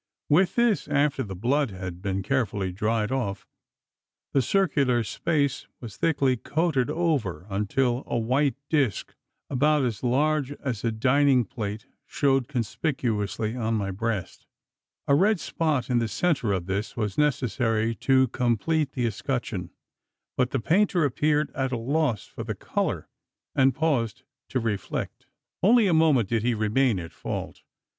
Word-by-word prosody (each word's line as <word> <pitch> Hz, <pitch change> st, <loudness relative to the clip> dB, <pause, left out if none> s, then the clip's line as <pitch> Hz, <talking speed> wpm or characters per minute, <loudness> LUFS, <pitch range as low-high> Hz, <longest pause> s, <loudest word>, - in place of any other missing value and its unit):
With 175 Hz, +4 st, +3 dB
this 235 Hz, -3 st, +2 dB
after 140 Hz, -1 st, +1 dB
the 100 Hz, -6 st, -5 dB
blood 130 Hz, +8 st, +1 dB
had 90 Hz, -2 st, -7 dB
been 95 Hz, -1 st, -2 dB
carefully 105 Hz, -6 st, -1 dB
dried 110 Hz, +4 st, -1 dB
off 115 Hz, -7 st, -2 dB, 0.9 s
the 135 Hz, -, +4 dB
circular 135 Hz, -7 st, +2 dB
space 140 Hz, +3 st, -1 dB
was 110 Hz, -6 st, -9 dB
thickly 140 Hz, -3 st, +1 dB
coated 145 Hz, -1 st, 0 dB
over, 145 Hz, -, -1 dB
until 120 Hz, +5 st, 0 dB
a -, -, -1 dB
white 130 Hz, +5 st, +1 dB
disc, 135 Hz, -, 0 dB, 0.3 s
about 145 Hz, +1 st, +2 dB
as 115 Hz, -4 st, -3 dB
large 145 Hz, +3 st, +1 dB
as 130 Hz, -7 st, -4 dB
a 115 Hz, -, +1 dB
dining 130 Hz, +2 st, +3 dB
plate 105 Hz, 0 st, -5 dB, 0.2 s
shewed 135 Hz, -3 st, +1 dB
conspicuously 115 Hz, -, -2 dB
on 115 Hz, -2 st, -1 dB
my 100 Hz, -2 st, -1 dB
breast! 105 Hz, -1 st, -4 dB, 0.6 s
A 140 Hz, -, +4 dB
red 195 Hz, +6 st, +4 dB
spot 155 Hz, -9 st, -1 dB
in 125 Hz, -2 st, +2 dB
the 115 Hz, -, 0 dB
centre 125 Hz, -, 0 dB
of 95 Hz, -3 st, -1 dB
this 100 Hz, +5 st, -3 dB
was 105 Hz, -4 st, -2 dB
necessary 115 Hz, -5 st, +1 dB
to 130 Hz, -1 st, +3 dB
complete 130 Hz, +5 st, 0 dB
the 125 Hz, -2 st, -1 dB
escutcheon; 115 Hz, -5 st, -3 dB, 0.7 s
but 125 Hz, -1 st, +1 dB
the 135 Hz, -, -1 dB
painter 180 Hz, -, +2 dB
appeared 150 Hz, +2 st, +1 dB
at 135 Hz, -1 st, -1 dB
a 125 Hz, -, -1 dB
loss 130 Hz, -2 st, 0 dB
for -, -, -8 dB
the -, -, -4 dB
colour, -, -, -2 dB, 0.5 s
and 135 Hz, -2 st, +3 dB
paused 130 Hz, -6 st, 0 dB, 0.3 s
to 130 Hz, -, 0 dB
reflect. 110 Hz, -4 st, -4 dB, 0.3 s
Only 225 Hz, +4 st, +5 dB
a 185 Hz, -, +3 dB
moment 155 Hz, -9 st, +4 dB
did 115 Hz, +1 st, 0 dB
he 120 Hz, +1 st, +1 dB
remain 110 Hz, +2 st, +2 dB
at 85 Hz, -1 st, -8 dB
fault. -, -, -5 dB
125 Hz, 150 wpm, -26 LUFS, 110-145 Hz, 0.9 s, Only